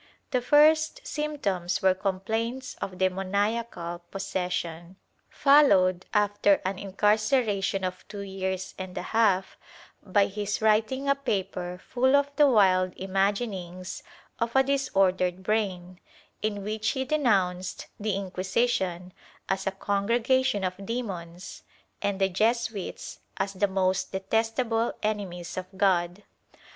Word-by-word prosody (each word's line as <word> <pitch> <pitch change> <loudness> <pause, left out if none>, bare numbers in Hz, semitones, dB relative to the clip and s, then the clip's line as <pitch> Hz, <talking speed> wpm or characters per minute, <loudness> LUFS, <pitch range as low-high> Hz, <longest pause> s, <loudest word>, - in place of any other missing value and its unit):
The 250 - +1
first 310 - +4
symptoms 205 - -2
were 190 -1 +5
complaints 220 +7 -2
of 185 -1 -4
demoniacal 190 0 -1
possession, 180 -3 -4 0.3
followed, 195 -11 +4
after 205 -1 +3
an 190 0 -1
incar 205 +2 +2
ceration 205 -5 +1
of 185 0 -9
two 205 -1 -7
years 190 -1 -4
and 185 -1 -6
a - - -3
half, 200 -4 +2 0.4
by 200 +1 +2
his 205 +1 -3
writing 220 +5 +2
a 275 - +5
paper 190 -9 -3
full 260 +2 +3
of 285 0 +1
the 295 -1 +6
wild 185 -5 +4
imaginings 190 -2 -2 0.4
of 230 +1 -1
a 265 - +6
disordered 190 -9 +1
brain, 185 -4 -2 0.4
in 205 -2 -2
which 215 +1 -1
he 265 - -1
denounced 195 - 0
the 210 -2 -1
Inquisition 190 -1 -1 0.3
as 195 0 -1
a - - +2
congregation 225 +4 +1
of 185 +1 -3
demons 190 -6 -5 0.4
and 200 -1 -1
the 195 - +3
Jesuits 220 +1 -1 0.2
as 195 +1 -1
the 205 +2 +1
most 190 -1 0
detestable 225 +4 0
enemies 190 -6 -3
of 185 0 -4
God. 180 0 +1
200 Hz, 120 wpm, -27 LUFS, 185-230 Hz, 0.4 s, the